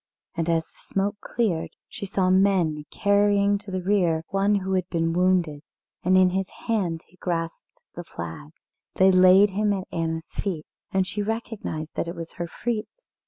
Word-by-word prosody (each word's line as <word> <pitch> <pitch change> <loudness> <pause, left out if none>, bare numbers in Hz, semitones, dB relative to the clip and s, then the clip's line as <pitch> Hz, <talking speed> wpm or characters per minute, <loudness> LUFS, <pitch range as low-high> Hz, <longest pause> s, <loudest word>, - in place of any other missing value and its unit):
And 165 -1 -1
as 165 -1 +2
the - - -34
smoke 200 +2 -2
cleared 195 -9 -1 0.2
she 200 - -7
saw 185 -1 +1
men 185 -6 +2
carrying 200 0 +3
to 205 0 -11
the 185 -1 -3
rear 175 -5 +2
one 200 +1 +2
who 190 -1 -1
had 185 -1 0
been 165 -1 0
wounded, 175 -4 +2 0.4
and 185 +1 +4
in 185 -1 +5
his 190 0 -1 0.2
hand 180 -8 0
he 180 - -25
grasped 165 -2 -4
the 175 - -7
flag. 85 - -7 0.5
They 190 0 +6
laid 185 +2 +7
him 205 +1 +1
at 190 -2 -4
Anna's 165 -1 -3
feet, 170 -7 -3 0.3
and 190 -1 +2
she 210 - -3
recognised 210 -7 -4
that - - -2
it 170 - -5
was 165 -1 -7
her 175 -1 -3
Fritz. 240 - -5
185 Hz, 175 wpm, -25 LUFS, 165-200 Hz, 0.5 s, laid